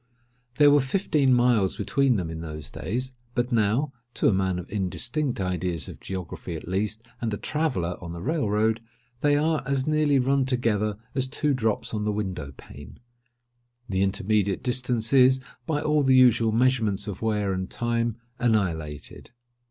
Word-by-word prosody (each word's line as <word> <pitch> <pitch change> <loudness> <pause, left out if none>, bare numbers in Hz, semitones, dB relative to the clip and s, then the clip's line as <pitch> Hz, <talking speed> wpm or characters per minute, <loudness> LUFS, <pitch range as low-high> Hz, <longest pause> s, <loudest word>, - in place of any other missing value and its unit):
There 145 +1 +6
were 145 0 +5
fifteen 140 -1 +1
miles 120 -6 +3
between 135 -3 +2
them 90 -5 -2
in 80 0 -6
those 75 -3 -7
days; 130 +5 -3 0.2
but 120 0 0
now 115 +6 +1 0.2
(to - - +2
a - - +4
man 95 -1 0
of 90 - -6
indistinct 120 - -1
ideas 90 -3 -1
of - - -9
geography, 90 -2 -6
at 80 - -8
least, 105 +4 -1 0.2
and 115 -2 -1
a 105 - -2
traveller 130 - -2
on 85 -2 -7
the 85 0 -7
Rail 150 -5 0
road) 110 +2 +1 0.4
they 145 +1 +3
are 155 +1 +1
as 135 -1 -1
nearly 155 -2 +3
run 135 +1 +2
together 110 -5 0 0.2
as 130 -1 0
two 145 +2 0
drops 115 -5 -1
on 105 -1 -1
the 105 - 0
window 95 -9 -4
pane. 70 +2 -12 0.9
The 95 -2 0
intermediate 100 0 +1
distance 125 -2 0
is, 130 0 +6 0.3
by 150 -2 0
all 150 0 +2
the 135 -2 +4
usual 120 -3 +5
measurements 110 -4 +1
of 100 -3 -6
wear 105 -3 0
and 95 0 -3
time, 115 -1 -1 0.2
annihilated. 85 - -1
110 Hz, 165 wpm, -26 LUFS, 95-130 Hz, 0.9 s, There